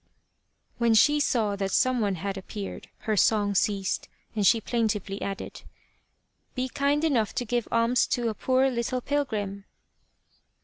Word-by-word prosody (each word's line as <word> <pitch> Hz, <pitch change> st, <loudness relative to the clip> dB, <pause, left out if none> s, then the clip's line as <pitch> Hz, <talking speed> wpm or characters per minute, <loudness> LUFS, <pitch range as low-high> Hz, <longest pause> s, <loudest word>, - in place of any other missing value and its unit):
When 235 Hz, -1 st, +3 dB
she 295 Hz, +6 st, +5 dB
saw 220 Hz, -7 st, +1 dB
that 195 Hz, -1 st, -1 dB
some 255 Hz, +5 st, +2 dB
one 200 Hz, -2 st, 0 dB
had 195 Hz, +3 st, -4 dB
appeared, 195 Hz, +1 st, -7 dB
her 215 Hz, -, 0 dB
song 205 Hz, -1 st, +3 dB
ceased, 195 Hz, 0 st, 0 dB, 0.3 s
and 205 Hz, -3 st, +3 dB
she 230 Hz, -, +5 dB
plaintively 210 Hz, -4 st, -2 dB
added: 195 Hz, -1 st, -5 dB, 0.5 s
" -, -, -46 dB
Be 255 Hz, 0 st, -2 dB
kind 285 Hz, +3 st, 0 dB
^enough 240 Hz, -10 st, +1 dB
to 245 Hz, -, -2 dB
give 240 Hz, 0 st, -1 dB
alms 230 Hz, +1 st, +2 dB
to 240 Hz, -2 st, 0 dB
a -, -, -2 dB
poor 260 Hz, +4 st, +2 dB
little 250 Hz, +1 st, -2 dB
pilgrim." 210 Hz, -9 st, -2 dB
225 Hz, 150 wpm, -27 LUFS, 200-255 Hz, 0.5 s, she